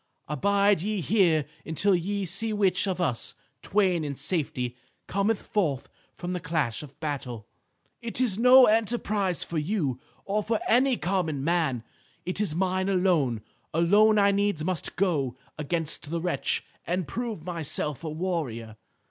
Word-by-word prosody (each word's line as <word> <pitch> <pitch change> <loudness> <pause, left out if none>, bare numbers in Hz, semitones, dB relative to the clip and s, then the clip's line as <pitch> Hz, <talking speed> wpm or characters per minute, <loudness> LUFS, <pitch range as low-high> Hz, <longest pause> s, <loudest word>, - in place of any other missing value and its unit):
Abide 200 +5 +2
ye 210 +2 -1
here 170 - +3 0.2
until 190 +5 +1
ye 195 +3 -1
see 220 +6 -1
which 195 -2 +2
of 185 -1 -2
us 135 -10 -1 0.3
twain 185 -5 +1
in 145 -2 -3
safety 130 -7 -2 0.3
cometh 200 +2 0
forth 165 - -1 0.3
from 180 0 -4
the 180 - -2
clash 150 -8 -1
of 145 -2 -12
battle. 130 -7 -4 0.6
"It 235 0 -4
is 225 -6 +1
no 250 +2 +8
enterprise 210 - +1
for 165 - -3
you, 150 - -1 0.3
or 205 +2 0
for 220 +1 -1
any 255 +1 +4
common 170 -7 -1
man. 155 -7 +1 0.4
It 185 +3 -2
is 180 -7 0
mine 185 +1 0
alone. 170 - +2 0.3
Alone 205 +6 +5
I 200 -1 +5
needs 200 -5 0
must 180 -1 -3
go 145 -10 0 0.2
against 155 0 -2
the 170 +1 -1
wretch 175 +1 0 0.2
and 180 -2 -1
prove 225 - -4
myself 160 -4 -2
a 160 - -3
warrior. 150 -10 -3
180 Hz, 150 wpm, -27 LUFS, 150-200 Hz, 0.6 s, no